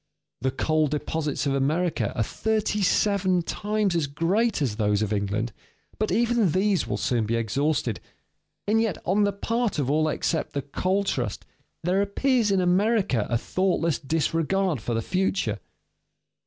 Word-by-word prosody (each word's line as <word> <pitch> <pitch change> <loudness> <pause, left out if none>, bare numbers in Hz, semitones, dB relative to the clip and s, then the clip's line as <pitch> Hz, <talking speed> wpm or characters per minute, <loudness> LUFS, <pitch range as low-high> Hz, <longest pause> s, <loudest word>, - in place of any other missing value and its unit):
The 130 - +1
coal 155 +3 +1
deposits 150 0 -2
of 140 - +1
America 155 +6 0
are 115 - +1
thirty 215 - -1
seven 190 -2 +2
times 210 0 -1
as 160 -4 +1
great 185 +10 +1
as 125 -8 -1
those 105 -1 +1
of 105 0 -1
England, 105 +3 -1 0.5
but 215 - 0
even 230 -6 +2
these 195 0 +1
will - - -2
soon 115 -4 0
be 115 - 0
exhausted. 115 - 0 0.7
And 220 +2 +3
yet 220 -5 0
on 205 +3 +3
the 200 - +1
part 230 +2 -1
of 140 -2 0
all 155 +1 +2
except 160 +2 -1
the 140 -2 -2
coal 185 +7 0
trust, 120 - -2 0.4
there 185 +3 +2
appears 230 +3 +1
in 195 -2 +2
America 180 - +2
a 115 - +2
thoughtless 170 +2 0
disregard 165 - 0
for 120 +2 -2
the 115 - -1
future. 190 - 0
170 Hz, 155 wpm, -25 LUFS, 135-200 Hz, 0.7 s, And